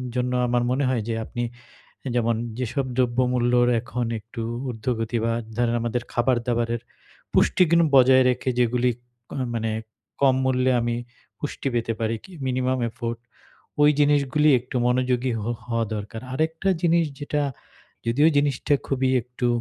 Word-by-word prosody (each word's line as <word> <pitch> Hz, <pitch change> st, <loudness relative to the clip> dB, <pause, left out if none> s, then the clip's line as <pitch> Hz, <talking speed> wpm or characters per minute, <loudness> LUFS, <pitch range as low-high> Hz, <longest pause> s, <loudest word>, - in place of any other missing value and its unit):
জন্য 125 Hz, 0 st, 0 dB, 0.2 s
আমার 120 Hz, 0 st, +1 dB
মনে 135 Hz, +3 st, +1 dB
হয় 125 Hz, -3 st, 0 dB
যে 115 Hz, -, -1 dB
আপনি 120 Hz, -, -4 dB, 0.6 s
এ -, -, 0 dB
যেমন, 115 Hz, -1 st, +2 dB, 0.2 s
যেসব 130 Hz, +2 st, -1 dB
দ্রব্যমূল্যর 125 Hz, -1 st, +2 dB
এখন 120 Hz, +1 st, -3 dB
একটু 115 Hz, +2 st, -7 dB, 0.3 s
উর্ধ্বগতি 115 Hz, 0 st, -2 dB
বা 115 Hz, -, +1 dB, 0.2 s
ধরেন 120 Hz, -1 st, +1 dB
আমাদের 120 Hz, +1 st, -1 dB
খাবার 125 Hz, +1 st, +2 dB
দাবারের 120 Hz, -1 st, 0 dB, 0.5 s
পুষ্টিগুন 170 Hz, -2 st, +4 dB
বজায় 130 Hz, 0 st, +7 dB
রেখে 125 Hz, +1 st, -1 dB
যেগুলিক 125 Hz, 0 st, +2 dB, 0.3 s
কোন -, -, -5 dB, 0.2 s
মানে 115 Hz, -1 st, -1 dB, 0.5 s
কম 135 Hz, -2 st, +5 dB
মূল্যে 130 Hz, 0 st, +2 dB
আমি 120 Hz, 0 st, -1 dB, 0.4 s
পুষ্টি 145 Hz, -2 st, -3 dB
পেতে 115 Hz, -1 st, 0 dB
পারি। 115 Hz, 0 st, 0 dB
কি 190 Hz, -, -13 dB
মিনিমাম 130 Hz, 0 st, 0 dB
এফোর্ট, 115 Hz, 0 st, -4 dB, 0.6 s
ওই 145 Hz, -, +7 dB
জিনিসগুলি 145 Hz, +1 st, +3 dB
একটু 125 Hz, +1 st, -7 dB
মনোযোগী 125 Hz, 0 st, +1 dB
হো 110 Hz, +3 st, -2 dB, 0.2 s
হওয়া 115 Hz, -1 st, 0 dB
দরকার। 105 Hz, +2 st, -6 dB
আরেকটা 160 Hz, +6 st, -1 dB
জিনিস 170 Hz, -1 st, +4 dB, 0.2 s
যেটা 145 Hz, 0 st, -1 dB, 0.6 s
যদিও 140 Hz, +7 st, +4 dB
জিনিসটা 145 Hz, 0 st, +2 dB
খুবই 130 Hz, -1 st, +1 dB
একটু 125 Hz, +1 st, -4 dB
125 Hz, 145 wpm, -24 LUFS, 120-130 Hz, 0.6 s, বজায়